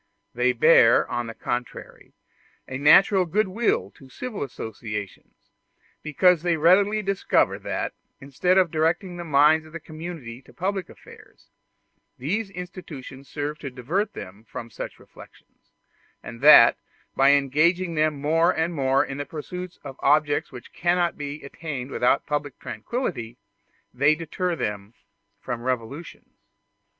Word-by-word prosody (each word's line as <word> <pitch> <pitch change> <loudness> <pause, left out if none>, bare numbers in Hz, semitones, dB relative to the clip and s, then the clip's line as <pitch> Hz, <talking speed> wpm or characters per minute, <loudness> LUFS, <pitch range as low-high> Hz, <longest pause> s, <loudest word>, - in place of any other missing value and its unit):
They 125 +1 +2
bear, 125 -2 +5
on 120 -1 -2
the 115 - -8
contrary, 120 0 -6 0.5
a 130 - -5
natural 185 +6 +6
goodwill 210 +5 0
to 135 -4 -17
civil 250 - -6
associations, 110 -6 -7 0.5
because 165 +3 +3
they 170 -1 +1
readily 200 +6 +4
discover 195 0 +1
that, - - -3 0.3
instead 145 +7 0
of 185 -4 +3
directing 170 +3 0
the 175 - -5
minds 155 +1 +3
of 155 - -17
the 170 - -5
community 155 -7 -8
to 130 - -19
public 195 +1 -3
affairs, - - -17 0.7
these 195 - -2
institutions 165 -8 -9
serve 150 +1 -4
to 140 - -6
divert 140 - -2
them 100 +4 -10
from 115 0 -9
such - - -7
reflections; - - -18 0.5
and 115 0 -9
that, 140 -5 +8 0.4
by 135 +1 +5
engaging 160 +6 +2
them 155 -2 0
more 160 +4 +2
and 160 +2 0
more 135 -3 +2
in 135 +1 -7
the 145 - -3
pursuit 180 +3 -7
of 135 - -9
objects 145 +1 +2
which 125 -2 -12
cannot 175 0 +1
be 145 +1 -7
attained 140 -3 -6
without 125 +3 +1
public 145 -2 -3
tranquillity, 120 - -5 0.6
they 140 +5 +3
deter 170 +2 -3
them 105 -5 -5 0.4
from 120 -1 -5
revolutions. 130 +6 -5
150 Hz, 135 wpm, -24 LUFS, 130-175 Hz, 0.7 s, that